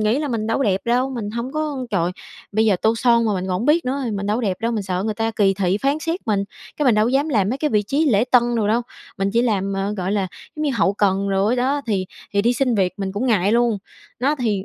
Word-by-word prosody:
nghĩ 215 +5 +2
là 300 - -2
mình 225 -4 -2
đâu 225 - 0
có 275 - +1
đẹp 195 -2 +1
đâu, 250 +3 +1
mình 220 -5 -4
hông 235 +3 -4
có 300 -4 -3
trời, 175 -3 +1 0.4
bây 220 +2 +2
giờ 210 -4 +3
tô 220 +1 +3
son 235 0 +3
mà 215 - +1
mình 185 -1 -2
còn - - -4
hổng 235 - -3
biết 320 +3 +3
nữa, 260 +2 -1
mình 200 0 -3
đâu 210 +4 0
đẹp 195 -6 -1
đâu, 230 +1 0
mình 215 - -1
sợ 185 -1 -2
người 215 - -1
ta 225 0 -1
kỳ 200 -3 +2
thị 190 0 0
phán 275 +5 0
xét 330 +3 -3
mình, 200 -3 +1 0.3
cái 300 - 0
mình 240 - +5
đâu 215 +1 +3
có - - +1
dám 280 +4 +1
làm 205 -9 +1
mấy 260 - -2
cái 300 0 0
vị 210 -3 +2
trí 280 +10 0
lễ 220 -3 +3
tân 250 -2 +6
đồ 210 -2 +1
đâu, 230 +3 +2 0.4
mình 195 0 0
chỉ 235 +2 +3
làm, 200 -4 0
ờ, 195 +1 -2
gọi 190 +1 -2
là, 200 -2 0 0.3
giống 305 - -3
như 295 - +1
hậu 200 -2 +2
cần 200 -1 +1
đồ 195 +5 +2
đó, 265 +4 0
thì 190 -4 0 0.3
thì 200 0 +2
đi 235 - +3
xin 250 -1 +1
việc 190 -3 +1
mình 195 -2 -3
cũng 225 +6 -2
ngại 205 -4 +2
luôn. 235 -2 +2 0.4
Đó 280 +4 +2
thì, 210 -6 -1
220 Hz, 290 wpm, -21 LUFS, 200-250 Hz, 0.4 s, tân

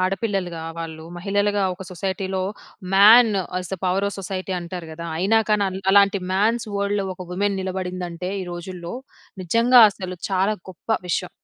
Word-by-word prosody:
ఆడపిల్లలుగా 185 -3 -1 0.2
వాళ్ళు, 160 -1 -6
మహిళలుగా 205 +2 0
ఒక 190 - -9
సొసైటీలో, 190 +1 -3 0.5
"man 220 +4 +8 0.3
as 180 -1 -7
the 190 - -3
power 185 +2 +1
of 200 - -7
society" 190 0 -4
అంటారు 175 -1 -7
కదా! 170 +1 -8
అయినా 200 +6 +3
కానీ 210 -1 +3
అల్ 190 0 -5
అలాంటి 200 0 +5
మ్యాన్స్ 225 +5 +1
వరల్డ్‌లో 200 0 0
ఒక 185 -1 -9
వుమెన్ 200 +2 0
నిలబడిందంటే, 180 -1 -4
ఈ - - -5
రోజుల్లో 175 0 -7 0.5
నిజంగా 230 +7 +5
అసలు 185 -2 -7
చాలా 195 +3 +2 0.2
గొప్ప 180 - -19 0.2
విషయం. 180 +1 -1
190 Hz, 150 wpm, -22 LUFS, 180-200 Hz, 0.5 s, man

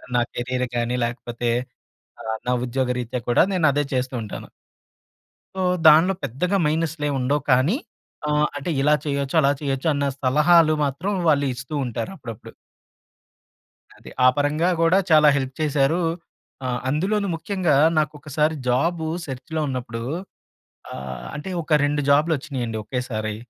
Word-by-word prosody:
నా 120 - +4
కెరియర్ 125 +1 -2
కానీ 120 +1 0
లేకపోతే 120 0 -3 0.7
ఆహ్, 110 0 -3
నా - - +2
ఉద్యోగ 130 +1 -1
రీత్యా 125 +1 -4
కూడా 120 - +5
నేను 175 -4 +3
అదే 145 +2 +1
చేస్తూ 130 0 -1
ఉంటాను. 105 - -8 1.1
సో, 190 - -1 0.2
దాన్లో 160 +5 +7
పెద్దగా 160 - -1
మైనస్‌లేముండవు 145 -3 0
కానీ 130 - +3 0.5
ఆహ్, 150 0 +3
అంటే 145 +4 -3
ఇలా 150 +2 +4
చేయొచ్చు 140 -1 -2
అలా 140 -1 +3
చేయొచ్చన్న 140 +1 0 0.2
సలహాలు 155 +4 +4
మాత్రం 145 +9 -2 0.2
వాళ్ళిస్తూ 140 -2 0
ఉంటారు 125 - -4
అప్పుడప్పుడు. 115 -7 -10 1.4
అది. - - -12
ఆ - - +8
పరంగా 150 +4 +1
గూడా 165 +3 +4
చాలా 155 -1 +7
హెల్ప్ 130 -1 -3
చేశారూ. 150 +2 +2 0.7
ఆహ్, 125 -1 -2
అందులోను 195 +8 0
ముఖ్యంగా 170 -2 0 0.2
నాకొకసారి 150 0 0
జాబూ 160 +6 +1 0.2
సెర్చ్‌‌లో 135 +4 -5
ఉన్నప్పుడూ 120 -3 -4 0.9
ఆహ్, 65 -1 -7
అంటే 150 +5 -6
ఒక 155 -1 +2
2 145 0 +1
జాబూలొచ్చినీయండి 140 -6 +1
ఒకేసారి. 110 -3 -3
145 Hz, 125 wpm, -23 LUFS, 125-155 Hz, 1.4 s, ఆ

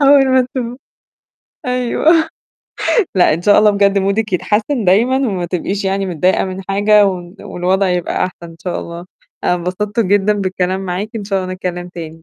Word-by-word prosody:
أول 275 -1 +6
ما 260 -1 +3
تب 245 -2 -3 0.9
أيوه. 255 +6 +2 0.9
لأ، 180 -4 +4
إن 165 - -5
شاء 205 +2 +5
الله 210 0 +5
بجد 200 -1 +2
مودِك 200 +2 -1
يتحسِّن 215 +7 0
دايمًا 220 +8 +3
وما 200 -10 -1
تبقيش 190 +3 -3
يعني 195 0 0
متضايقة 180 +1 +1
من 190 0 -6
حاجة 205 +1 +4
و 180 -2 -4
والوضع 185 +2 0
يبقى 180 0 -1
أحسن 180 -2 -7
إن 165 - -14
شاء 180 -2 -2
الله. 170 +1 -8 0.4
أنا - - +3
انبسطت 185 +5 -2
جدًا 205 0 +2
بالكلام 190 -2 -1
معاكِ، 190 +2 -3
إن 210 - -5
شاء 195 -2 -1
الله 185 - -5
نتكلِّم 180 -1 -5
تاني، 165 -2 -9
195 Hz, 170 wpm, -16 LUFS, 180-210 Hz, 0.9 s, أول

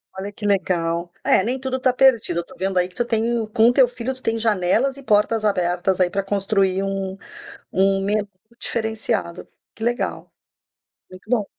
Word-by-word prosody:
Olha, 195 +2 -5
que 205 0 -8
legal. 175 -3 0
É, - - +4
nem 250 +5 -1
tudo 260 0 -3
tá 255 -1 +2
perdido. 235 -9 +3
Eu 170 - -4
tô - - -15
vendo 190 +1 -2
aí 180 - +1
que 180 - -21
tu 240 - -1
tem 230 0 0
com 225 +2 +4
teu 255 0 +5
filho, 245 +1 -4
tu 260 - -14
tem 225 -2 0
janelas 225 +5 +1
e 275 - -11
portas 215 -1 +2
abertas 180 -1 0
aí 180 -1 +3
pra 195 +1 -2
construir 195 -1 0
um 195 -1 -3 0.5
um 195 0 +2
menu 205 +1 0 0.3
diferenciado. 220 -6 -3 0.3
Que 220 - -9
legal! 240 +1 -2 0.8
Muito 185 +4 -14
bom. 230 -5 +1
205 Hz, 180 wpm, -21 LUFS, 190-235 Hz, 0.8 s, teu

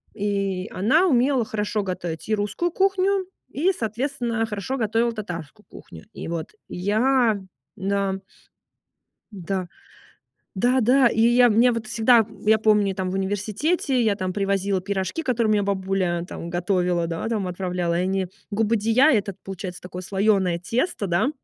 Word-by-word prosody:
и 200 -2 -1
она 265 - +3
умела 260 -4 +2
хорошо 210 0 -2
готовить 175 -3 -5
и - - +2
русскую 210 +12 -2
кухню, 390 +1 +1 0.2
и, 355 +7 +1
соответственно, 235 -1 -2
хорошо 210 +5 -4
готовила 225 +1 +1
татарскую 175 - -7
кухню. 80 -1 -13
И - - -7
вот 165 -2 -4 0.2
я 220 +4 +2 0.4
да. 195 -1 -1 1.2
Да. 190 -1 -3 0.9
Да, 250 +6 +2
да, 250 +3 +5
и 225 -1 0
я, 240 +1 +6
мне 235 +4 +4
вот 230 -2 -4
всегда, 230 +2 +4
м, 220 0 -4
я 220 +1 +5
помню, 210 -2 +3
и - - -4
там 185 -1 -3
в - - -4
университете 215 - 0
я 215 -3 +2
там 185 -2 -3
привозила 195 -1 0
пирожки, 190 - -2
которые 235 -5 +1
у - - +4
меня 205 -1 +2
бабуля 190 -3 -1
там 170 - -7
готовила, 175 -1 0
да, 165 +6 -3
там, 210 -5 -1
отправляла 180 -1 -2
и - - +1
они. 190 0 -1 0.2
Губадия- 225 +5 +3
этот 200 -4 0
получается 190 -2 -6
такое 180 0 -7
слоеное 190 -2 +1
тесто, 230 - -1
да. 175 +9 +2
205 Hz, 155 wpm, -23 LUFS, 185-235 Hz, 1.2 s, я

